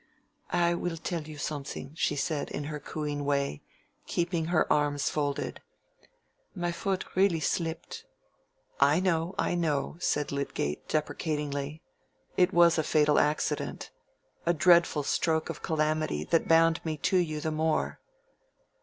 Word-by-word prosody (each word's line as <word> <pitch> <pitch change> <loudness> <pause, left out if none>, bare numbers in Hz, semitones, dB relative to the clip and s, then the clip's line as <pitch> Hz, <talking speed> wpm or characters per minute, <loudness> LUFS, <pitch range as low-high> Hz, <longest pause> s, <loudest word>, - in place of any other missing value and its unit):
"I 175 -1 +2
will 170 -1 -2
tell 170 +1 -3
you 155 -1 -9
something," 145 -2 -5
she 155 -2 0
said, 145 +1 -2
in 145 - -4
her 150 0 -5
cooing 145 -1 -4
way, 140 - 0 0.5
keeping 170 -1 0
her 170 -1 +2
arms 145 -1 +1
folded. 145 -2 -2 0.9
"My 175 -2 -1
foot 190 +2 -2
really 185 -3 +3
slipped." 165 +1 -3 0.7
"I 145 +4 +5
know, 180 -1 0
I - - +1
know," 155 -3 -1
said 150 -4 0
Lydgate, 140 - -3
deprecatingly. 150 -1 -2 0.5
"It 180 +1 +4
was 170 -2 +5
a - - +2
fatal 150 -1 +3
accident—a 150 +2 -2
dreadful 170 -2 +4
stroke 160 +2 0
of - - -10
calamity 155 - 0
that 165 - +1
bound 165 0 +4
me 155 -2 -2
to 185 - +1
you 155 -4 0
the 160 +1 -2
more." 155 0 0
155 Hz, 135 wpm, -29 LUFS, 145-170 Hz, 0.9 s, I